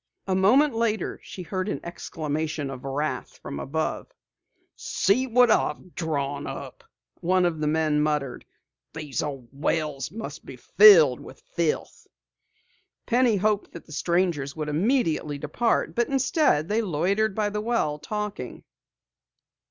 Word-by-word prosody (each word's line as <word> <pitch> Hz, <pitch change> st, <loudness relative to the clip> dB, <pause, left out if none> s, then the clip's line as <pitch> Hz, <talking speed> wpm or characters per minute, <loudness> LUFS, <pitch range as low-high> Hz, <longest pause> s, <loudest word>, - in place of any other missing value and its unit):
A 190 Hz, -, -1 dB
moment 250 Hz, +10 st, +4 dB
later 225 Hz, -3 st, -1 dB
she 185 Hz, -, -9 dB
heard 185 Hz, +3 st, -3 dB
an -, -, -2 dB
exclamation 155 Hz, -3 st, -4 dB
of 130 Hz, -2 st, -8 dB
wrath 145 Hz, +3 st, -3 dB
from 70 Hz, -, -7 dB
above. 160 Hz, +3 st, -3 dB, 0.7 s
"See 250 Hz, +7 st, +1 dB
what 245 Hz, -1 st, +5 dB
I've 175 Hz, -2 st, 0 dB
drawn 145 Hz, -4 st, -2 dB
up!" -, -, -8 dB, 0.4 s
one 185 Hz, +1 st, +2 dB
of 165 Hz, -3 st, -1 dB
the 150 Hz, -, 0 dB
men 155 Hz, -1 st, +2 dB
muttered. 150 Hz, -4 st, -1 dB, 0.5 s
"These 150 Hz, -6 st, -3 dB
old 135 Hz, -5 st, -5 dB
wells 145 Hz, 0 st, -2 dB
must 210 Hz, -5 st, -7 dB
be 135 Hz, -, -10 dB
filled 165 Hz, -, +7 dB
with -, -, -13 dB
filth!" 170 Hz, -3 st, -2 dB, 1.0 s
Penny 245 Hz, -2 st, +3 dB
hoped 210 Hz, +1 st, 0 dB
that 170 Hz, -, -10 dB
the -, -, -16 dB
strangers 170 Hz, -3 st, 0 dB
would 155 Hz, -1 st, -3 dB
immediately 160 Hz, -, 0 dB
depart, 155 Hz, +11 st, 0 dB
but 240 Hz, 0 st, +1 dB
instead 270 Hz, -, +2 dB
they 215 Hz, +3 st, +1 dB
loitered 195 Hz, +3 st, 0 dB
by 210 Hz, -1 st, 0 dB
the 210 Hz, 0 st, -2 dB
well, 210 Hz, -10 st, 0 dB
talking. 210 Hz, +6 st, -5 dB
170 Hz, 135 wpm, -25 LUFS, 150-210 Hz, 1.0 s, filled